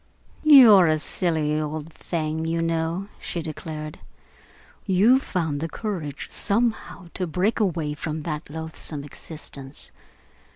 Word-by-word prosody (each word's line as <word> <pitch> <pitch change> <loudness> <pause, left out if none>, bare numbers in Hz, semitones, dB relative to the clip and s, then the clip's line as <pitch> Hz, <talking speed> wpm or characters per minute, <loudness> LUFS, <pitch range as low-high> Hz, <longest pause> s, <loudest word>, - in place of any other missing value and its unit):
"You're 240 - +9
a 155 0 +3
silly 155 -2 0
old 155 +1 -5
thing, 160 -1 -3
you 165 +1 0
know," 165 +3 -1
she 170 - -4
declared. 155 -1 -6 0.9
"You 210 +7 +5
found 160 - -2
the 165 +2 -3
courage, 165 -11 -4
somehow, 215 -4 -1
to 185 - -2
break 185 +9 0
away 165 -7 0
from 155 +1 -4
that 150 -1 -4
loathsome 160 -1 -6
existence. 145 -2 -8
160 Hz, 120 wpm, -24 LUFS, 155-185 Hz, 0.9 s, You're